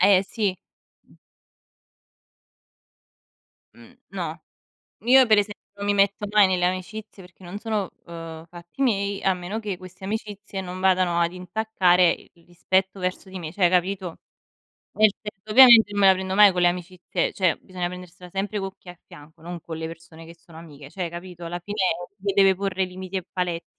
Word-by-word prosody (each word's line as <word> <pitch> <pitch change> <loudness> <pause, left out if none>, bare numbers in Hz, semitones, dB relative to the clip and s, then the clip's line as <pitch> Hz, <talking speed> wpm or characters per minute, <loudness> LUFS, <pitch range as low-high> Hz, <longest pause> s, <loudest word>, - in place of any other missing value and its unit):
Eh 190 0 +5
sì. 200 -2 -2 0.5
Mh. - - -23 2.6
Mh, - - -16 0.2
no. - - -5 0.6
Io 260 +2 +6
per 215 -2 +4
esempio 205 0 -3 0.2
non 200 - -5
mi 205 - +2
metto 200 +1 +2
mai 210 -2 +6
nelle 185 -1 0
amicizie 190 +3 -5
perché 180 +1 -18
non 185 +4 -7
sono, 215 -4 -2 0.2
uhm, 165 -1 -9
fatti 175 +8 -11
miei, 200 -5 0
a 190 - +2
meno 180 +5 -5
che 210 -3 -4
queste 185 +1 -11
amicizie 205 -1 -5
non 180 0 -7
vadano 185 -2 +2
ad 170 +1 +1
intaccare 180 -2 +2
i - - -13
il 170 -1 -25
rispetto 190 +2 -1
verso 185 +1 -3
di 190 - -7
me, 160 -3 -6
cioè 180 0 +3
capito? 185 0 -1 0.8
Nel 215 -1 +6
senso 210 0 -9
ovviamente 235 -3 +8
non 205 0 -1
me 195 - +7
la 190 - +8
prendo 190 0 -4
mai 205 -1 +8
con 180 -1 -1
le 175 - +5
amicizie, 180 0 -3
cioè 185 -4 +1
bisogna 185 -1 -6
prendersela 180 0 -11
sempre 200 +2 -3
con 195 0 -4
chi - - -24
hai 175 - -9
a - - -39
fianco, 160 -1 -16
non 175 0 -6
con 160 0 -7
le 160 - -4
persone 165 0 -12
che 165 - -12
sono 165 -1 -17
amiche, 150 -4 -12
cioè 180 +2 -4
capito, 175 0 -9
alla 175 +1 -4
fine 205 +4 -7 0.4
le 200 0 -2
deve 195 -1 +5
porre 190 0 -1
limiti 185 +1 -6
e 185 - -6
paletti. 175 -2 -3
185 Hz, 185 wpm, -24 LUFS, 175-200 Hz, 2.6 s, ovviamente